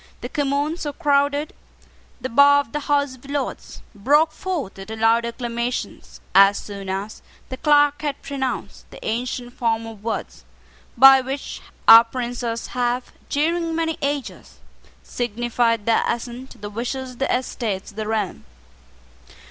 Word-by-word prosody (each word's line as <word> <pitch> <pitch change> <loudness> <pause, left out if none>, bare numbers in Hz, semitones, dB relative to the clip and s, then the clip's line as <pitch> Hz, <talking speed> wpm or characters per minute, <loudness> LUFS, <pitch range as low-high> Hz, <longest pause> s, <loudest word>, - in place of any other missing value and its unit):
The - - -5
Commons, 290 +3 -1
who 290 -1 -3
crowded 285 +1 +1 0.7
the - - -3
bar 285 +4 +6
of 255 - -13
the 295 - -2
House 285 -2 0
of 260 +2 -16
Lords, 285 -1 -4
broke 290 +10 +3
forth 310 - -4
into 220 +3 -7
loud 225 +1 +3
acclamations 235 +1 -4
as 195 +1 +7
soon 200 -2 -7
as 195 +3 -4 0.3
the 260 - -5
clerk 290 0 +3
had 290 -2 -3
pronounced 265 -2 -4
the - - -12
ancient 245 +2 -3
form 230 -2 -1
of 220 -2 -10
words 225 - -4 0.5
by 270 +1 +9
which 270 +2 -5 0.3
our 225 +1 +11
princes 235 -1 -4
have, 245 0 -1 0.2
during 330 +3 0
many 325 -1 -1
ages, 285 -1 -4 0.5
signified 235 -1 -1
their 230 - +3
assent 245 +2 -4
to - - -14
the 205 0 -8
wishes 255 +4 -4
of 245 - -15
the 270 - 0
Estates 225 -6 -2
of - - -22
the 215 -1 -3
realm. 210 - -2
250 Hz, 150 wpm, -22 LUFS, 230-285 Hz, 0.7 s, our